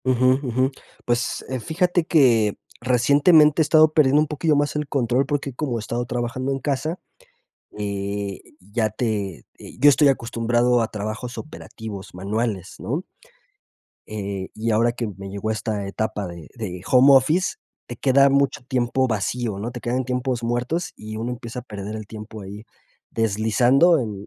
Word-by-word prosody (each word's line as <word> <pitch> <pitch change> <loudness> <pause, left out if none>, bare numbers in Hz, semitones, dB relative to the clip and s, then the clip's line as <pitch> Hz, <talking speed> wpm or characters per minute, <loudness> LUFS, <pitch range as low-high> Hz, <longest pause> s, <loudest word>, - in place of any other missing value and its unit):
Ujú, 130 +1 +3
ujú. 130 0 0 0.3
Pues, 120 0 -1
eh, 130 -1 -2
fíjate 175 +5 0
que 120 -10 +3 0.2
recientemente 145 +5 +5
he - - +6
estado 155 +1 +5
perdiendo 145 -2 +4
un 155 - +1
poquillo 150 +1 +1
más 145 +1 0
el 150 -1 -2
control, 130 -1 +1
porque 140 -2 -2
como 125 -2 -2
he - - -3
estado 120 +3 -3
trabajando 120 +2 -3
en 135 - 0
casa, 150 +5 -2 0.8
eh, 100 -1 -3 0.2
ya 110 +3 -1
te 105 -7 -3
eh, - - -12
yo 145 +3 +7
estoy 145 +1 +5
acostumbrado 120 -1 +1
a 115 - 0
trabajos 110 +4 -5
operativos 110 -9 -8
manuales, 100 +1 -3
¿no? - - -3 1.0
Eh, 100 -3 -5
y 115 +1 -1
ahora 115 +2 +3
que 120 -1 -3
me 100 0 -7
llegó 100 +2 -3
esta 105 -2 -3
etapa 105 0 -3
de 85 -3 -10
de 95 -7 -5
home 135 +2 +7
office, 155 - +2 0.3
te 120 - -7
queda 140 +2 +4
mucho 140 0 +1
tiempo 130 +1 0
vacío, 110 -1 -2
¿no? 115 +4 -4
Te 120 - -7
quedan 125 +2 -2
tiempos 125 -1 -2
muertos, 125 +9 -2
y 110 0 -8
uno 115 +3 -3
empieza 120 0 -6
a - - -8
perder 105 -3 -7
el 110 -1 -7
tiempo 110 0 -9
ahí, 100 +2 -9 0.5
deslizando 120 - +3
en 105 -5 -5
120 Hz, 165 wpm, -23 LUFS, 110-135 Hz, 1.0 s, yo